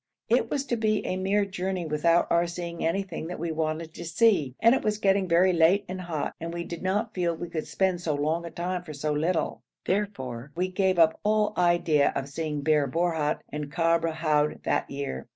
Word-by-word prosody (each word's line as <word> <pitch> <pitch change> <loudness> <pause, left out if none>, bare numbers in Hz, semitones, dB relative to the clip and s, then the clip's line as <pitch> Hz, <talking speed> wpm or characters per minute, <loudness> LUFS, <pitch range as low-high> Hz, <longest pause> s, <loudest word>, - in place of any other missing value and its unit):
It - - +2
was 280 -1 -1
to 240 - -1
be 215 -1 0
a - - -1
mere 195 +2 +1
journey 190 -2 -3
without 165 +3 +2
our 170 +1 +3
seeing 170 0 -5
anything 170 -1 -2
that 180 - -5
we 170 +1 -3
wanted 160 0 -2
to - - -8
see, 170 - +2
and 230 +1 +6
it 265 - +1
was 210 -1 0
getting 195 -2 +2
very 180 +2 +4
late 175 +5 +4
and 185 0 -5
hot, 165 -4 -3
and 165 +1 -5
we 170 0 -4
did 170 -1 -7
not 205 +4 -1
feel 175 -2 0
we 170 +1 -6
could 160 -2 -3
spend 185 -2 0
so 155 -4 -1
long 155 +4 0
a 170 - -6
time 180 +2 -3
for 155 -3 -8
so 150 +1 -2
little; 160 +3 -1 0.2
therefore 140 - -2
we 180 +2 0
gave 185 -1 +1
up 160 -1 +4
all 210 0 +2
idea 175 -4 +3
of 135 +1 -3
seeing 150 0 -3
Bir 150 -1 +2
Borhut 160 0 0
and 150 -1 -5
Kabr 165 0 +2
Houd 155 -2 0
that - - 0
year. 140 - -5
170 Hz, 210 wpm, -27 LUFS, 155-185 Hz, 0.2 s, and